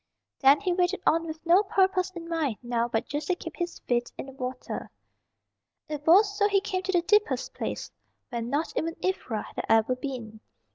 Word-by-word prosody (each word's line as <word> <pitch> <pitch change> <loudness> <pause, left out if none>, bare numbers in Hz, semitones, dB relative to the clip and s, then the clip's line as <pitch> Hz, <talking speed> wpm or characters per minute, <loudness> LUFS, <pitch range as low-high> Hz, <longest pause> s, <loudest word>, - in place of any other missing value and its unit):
Then 275 +1 +6
he 370 -3 +1
waded 360 +1 +1
on 330 +1 +3
with 315 +1 -7
no 350 +4 +6
purpose 380 -2 +2
in 335 -1 -7
mind 315 -9 -1
now 240 -1 0
but 230 -1 -1
just 290 0 -4
to 365 - +2
keep 330 - -8
his 345 0 -3
feet 240 -1 -1
in - - -5
the 270 - -10
water. 255 -1 -5 1.0
It 300 -1 -6
was 405 +4 +6
so 410 - +5
he 400 -1 +3
came 385 -2 -2
to 380 - -2
the 350 -2 +2
deepest 420 +4 +2
place; - - -4 0.4
where 235 - -3
not 285 +8 -2
even 330 +1 -1
Ivra 255 - -1
had - - -6
ever 225 +3 +4
been. 245 -5 -6
325 Hz, 195 wpm, -27 LUFS, 255-370 Hz, 1.0 s, Then